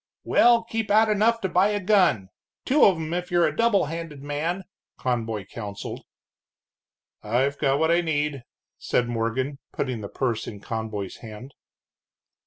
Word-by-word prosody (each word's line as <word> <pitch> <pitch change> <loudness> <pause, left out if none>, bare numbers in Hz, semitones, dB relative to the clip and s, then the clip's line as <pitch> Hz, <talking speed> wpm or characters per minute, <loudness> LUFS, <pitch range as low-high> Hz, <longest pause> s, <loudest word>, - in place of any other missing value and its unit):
"Well, 235 -1 +4
keep 225 -2 -3
out 215 +2 +5
enough 220 +2 +2
to 190 - 0
buy 180 +3 +4
a 210 0 0
gun, 185 - +3 0.4
two 290 +4 +5
of 190 - +5
'em 160 0 -4
if 180 0 -3
you're 175 -1 +3
a - - -1
double 230 -6 +3
handed 155 -2 -6
man," 160 +6 -2 0.3
Conboy 115 -5 -2
counseled. 100 0 -7 1.2
"I've 130 +6 0
got 135 0 +2
what 160 +2 +2
I 170 +1 +4
need," 150 -4 -1 0.4
said 120 - 0
Morgan, 120 +4 -2
putting 130 -5 -3
the 100 - -6
purse 120 -4 -2
in 105 - -7
Conboy's 110 -2 -5
hand. 115 +4 -10
145 Hz, 155 wpm, -25 LUFS, 115-190 Hz, 1.2 s, out